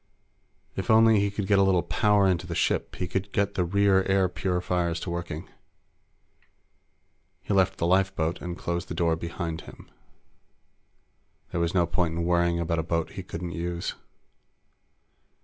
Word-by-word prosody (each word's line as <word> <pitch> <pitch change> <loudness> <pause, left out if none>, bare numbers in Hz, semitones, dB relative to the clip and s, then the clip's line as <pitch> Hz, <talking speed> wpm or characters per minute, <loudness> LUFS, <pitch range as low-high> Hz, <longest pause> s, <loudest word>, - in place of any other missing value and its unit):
If 95 - -4
only 110 -1 +6
he 100 0 +1
could 100 0 -3
get 100 0 +3
a - - +5
little 95 -3 +3
power 100 +3 +3
into 90 -1 0
the 85 - -4
ship, - - 0
he 90 - -3
could 95 +3 -3
get 100 0 0
the 90 - 0
rear 95 +2 +3
air 95 -1 +3
purifiers 90 -2 -1
to 85 - -4
working. 85 -2 -5 2.0
He - - -2
left 95 -1 +2
the - - -1
lifeboat 90 -2 +1
and 90 0 -5
closed 85 +1 -3
the - - -5
door 85 -2 +2
behind 85 0 -5
him. - - -14 1.6
There 85 - -1
was 85 +2 -1
no 90 -2 +4
point 85 0 -1
in 85 - -1
worrying 85 0 +2
about 85 -1 -1
a - - -1
boat 85 0 -1
he 100 - -6
couldn't 90 -1 -6
use. 85 0 -3
90 Hz, 165 wpm, -26 LUFS, 85-95 Hz, 2.0 s, only